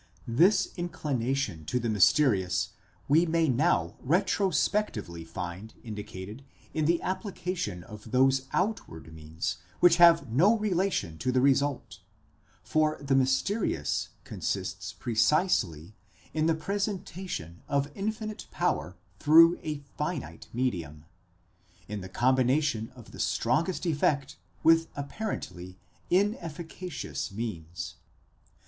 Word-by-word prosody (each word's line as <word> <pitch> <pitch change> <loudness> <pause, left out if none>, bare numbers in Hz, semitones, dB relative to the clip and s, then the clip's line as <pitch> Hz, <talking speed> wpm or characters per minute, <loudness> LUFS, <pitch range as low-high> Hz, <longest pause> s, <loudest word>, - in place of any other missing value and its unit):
This 185 - +4
inclination 135 - -2
to 125 +11 0
the 120 - -2
mys 105 -4 +5
terious 100 -12 +1 0.4
we 160 +5 +4
may 165 0 +2
now 145 +7 +1
retrospectively 180 - 0
find 90 +6 -7
indicated 105 +1 -7 0.3
in 155 -1 0
the 170 +2 +3
application 180 - -3
of 105 +4 -11
those 130 +2 +3
outward 130 - -2
means 80 +4 -4 0.2
which 175 -1 +6
have 170 -4 +7
no 190 - +5
relation 185 - -1
to 125 - 0
the 130 - +2
result; 140 0 +1 0.6
for 155 0 +1
the 140 -1 -1
mysterious 130 - +1
consists 95 -1 -3
precisely 115 - +1 0.4
in 155 0 +1
the 165 - +3
presentation 185 - -4
of 140 0 0
infinite 215 +1 -4
power 90 +6 -1 0.2
through 165 +3 +7
a 150 -2 -4 0.2
finite 150 -2 -4
medium, 85 - -3 0.8
in 105 -1 -5
the 95 - -8
combination 130 +1 +2
of 120 -3 -13
the - - -11
strongest 160 +11 0
effect 145 -3 +1 0.3
with 165 0 +5
apparently 140 - -5 0.3
inefficacious 175 - -2
means. 85 -6 -5
140 Hz, 110 wpm, -29 LUFS, 105-170 Hz, 0.8 s, have